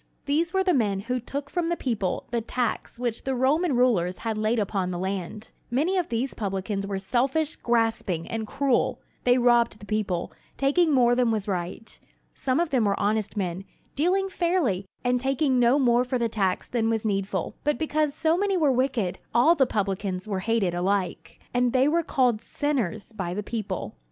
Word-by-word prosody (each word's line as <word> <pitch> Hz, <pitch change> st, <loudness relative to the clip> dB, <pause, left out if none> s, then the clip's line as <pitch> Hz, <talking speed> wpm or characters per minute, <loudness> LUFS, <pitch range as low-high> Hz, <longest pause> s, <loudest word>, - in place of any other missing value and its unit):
These 320 Hz, +4 st, +1 dB
were 380 Hz, 0 st, +2 dB
the 370 Hz, -1 st, +2 dB
men 205 Hz, -7 st, +1 dB
who 250 Hz, +4 st, -2 dB
took 280 Hz, +4 st, -5 dB
from 340 Hz, +2 st, -1 dB
the 345 Hz, -, +1 dB
people 215 Hz, -8 st, -2 dB
the 235 Hz, -1 st, 0 dB
tax 240 Hz, +1 st, -2 dB
which 240 Hz, -2 st, -2 dB
the 265 Hz, 0 st, -1 dB
Roman 280 Hz, +5 st, +2 dB
rulers 185 Hz, -8 st, +2 dB
had 225 Hz, -1 st, -3 dB
laid 215 Hz, +2 st, 0 dB
upon 195 Hz, -3 st, -1 dB
the 180 Hz, -, -3 dB
land. 190 Hz, +3 st, -4 dB, 0.2 s
Many 300 Hz, +10 st, +1 dB
of 360 Hz, -3 st, 0 dB
these 240 Hz, +3 st, -1 dB
publicans 195 Hz, 0 st, -3 dB
were 195 Hz, -1 st, -2 dB
selfish, 265 Hz, +10 st, 0 dB
grasping, 225 Hz, -8 st, 0 dB
and 225 Hz, -1 st, -3 dB
cruel. 275 Hz, 0 st, +1 dB, 0.3 s
They 245 Hz, 0 st, +5 dB
robbed 240 Hz, -3 st, +3 dB
the 205 Hz, -, -12 dB
people, 205 Hz, -5 st, -2 dB, 0.3 s
taking 305 Hz, +4 st, +3 dB
more 245 Hz, -3 st, +4 dB
than 245 Hz, -1 st, +2 dB
was 215 Hz, -2 st, -1 dB
right. 185 Hz, +3 st, -4 dB, 0.3 s
Some 260 Hz, +1 st, 0 dB
of 340 Hz, -3 st, 0 dB
them 250 Hz, -5 st, +2 dB
were 200 Hz, -1 st, +1 dB
honest 210 Hz, +1 st, 0 dB
men, 185 Hz, -1 st, -2 dB, 0.3 s
dealing 370 Hz, +6 st, +1 dB
fairly, 340 Hz, -, 0 dB, 0.2 s
and 250 Hz, 0 st, +2 dB
taking 270 Hz, 0 st, +1 dB
no 245 Hz, +3 st, +4 dB
more 245 Hz, -3 st, +3 dB
for 255 Hz, 0 st, -1 dB
the 235 Hz, -1 st, +1 dB
tax 195 Hz, -4 st, -1 dB
than 225 Hz, -2 st, 0 dB
was 225 Hz, -1 st, -1 dB
needful; 195 Hz, -3 st, -1 dB
but 295 Hz, 0 st, +1 dB
because 305 Hz, -2 st, 0 dB
so 320 Hz, 0 st, +2 dB
many 395 Hz, +1 st, +1 dB
were 300 Hz, -5 st, +3 dB
wicked, 245 Hz, -8 st, 0 dB, 0.2 s
all 250 Hz, +8 st, +6 dB
the 275 Hz, -6 st, +3 dB
publicans 195 Hz, -3 st, -2 dB
were 195 Hz, -3 st, -1 dB
hated 205 Hz, -3 st, 0 dB
alike; 185 Hz, 0 st, -2 dB
and 245 Hz, -1 st, +2 dB
they 260 Hz, +1 st, +4 dB
were 335 Hz, +3 st, +3 dB
called 250 Hz, -8 st, +1 dB
"sinners" 235 Hz, -, -2 dB
by 180 Hz, -4 st, -4 dB
the 210 Hz, -, -3 dB
people. 195 Hz, -, -4 dB
235 Hz, 190 wpm, -26 LUFS, 200-275 Hz, 0.3 s, all